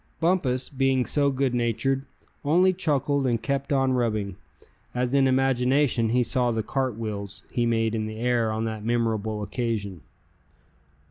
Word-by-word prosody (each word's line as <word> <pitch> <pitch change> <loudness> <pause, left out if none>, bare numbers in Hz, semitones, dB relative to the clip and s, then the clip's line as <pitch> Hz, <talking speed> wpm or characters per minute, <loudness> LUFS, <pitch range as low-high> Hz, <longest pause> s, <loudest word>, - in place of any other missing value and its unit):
Bumpus, 160 -7 +1
being 135 -2 +1
so 145 -1 +2
good 135 -1 0
natured, 125 +3 0 0.4
only 180 +6 +4
chuckled 145 -5 0
and 120 -2 +1
kept 140 +4 -2
on 135 -2 +2
rubbing, 110 -6 -1 0.6
as 125 +1 -1
in 135 -1 +4
imagination 130 -2 +2
he 125 +2 +3
saw 125 +1 +1
the 115 -2 -1
"cartwheels" 110 -6 -3
he 120 -1 +1
made 115 -1 +1
in 110 -1 -1
the 110 0 -7
air 120 -1 +1
on 110 +1 -2
that 110 -2 -4
memorable 110 -2 -1
occasion. 105 - -3
125 Hz, 145 wpm, -25 LUFS, 110-135 Hz, 0.6 s, only